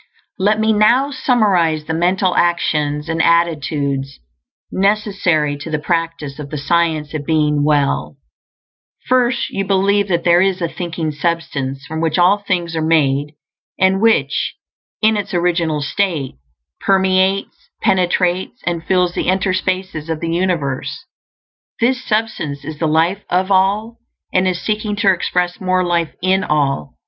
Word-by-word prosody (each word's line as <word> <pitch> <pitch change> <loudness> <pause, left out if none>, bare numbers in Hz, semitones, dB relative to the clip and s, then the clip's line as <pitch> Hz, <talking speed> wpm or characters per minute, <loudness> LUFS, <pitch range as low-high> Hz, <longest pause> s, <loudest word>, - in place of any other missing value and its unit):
Let 210 +3 +2
me 220 0 +2
now 240 +7 +3
summarize 195 - +1
the 160 - -3
mental 180 +2 +1
actions 150 -3 0
and 165 0 0
attitudes 145 -5 0 0.5
necessary 195 -7 +1
to 150 +3 -8
the 155 - -1
practice 165 -3 -3
of 145 -1 -7
the 150 - -5
Science 160 0 0
of 155 -2 -3
Being 150 -1 +1
Well: 140 - +1 0.9
first, 250 -1 +1
you 195 - -2
believe 200 +1 +2
that 170 -3 0
there 175 0 +4
is 190 -1 +1
a 170 - -1
Thinking 165 -2 -4
Substance, 140 -3 -3
from 160 +1 -5
which 160 -2 0
all 180 +4 +4
things 175 -4 -2
are 160 - -1
made, 150 -2 +1 0.4
and 190 +1 +2
which, 225 0 +1 0.5
in 220 0 +4
its 200 -2 -4
original 170 -4 0
state, 155 -2 -1 0.5
permeates, 190 0 +1
penetrates, 180 -1 0
and 170 -1 -2
fills 180 -1 +1
the - - -2
interspaces 185 -3 -1
of 160 -1 -2
the 165 0 -3
universe. 145 -6 -2 0.7
This 255 +2 +1
Substance 215 - -2
is 155 0 -7
the 160 - +1
Life 165 +6 +1
of 185 +2 0
All, 205 +4 +1 0.4
and 185 0 +2
is 180 -1 -1
seeking 210 0 -2
to 205 -2 +3
express 180 0 -2
more 185 0 +1
life 170 -2 -1
in 190 +1 +2
all. 140 - -1
175 Hz, 145 wpm, -18 LUFS, 155-195 Hz, 0.9 s, there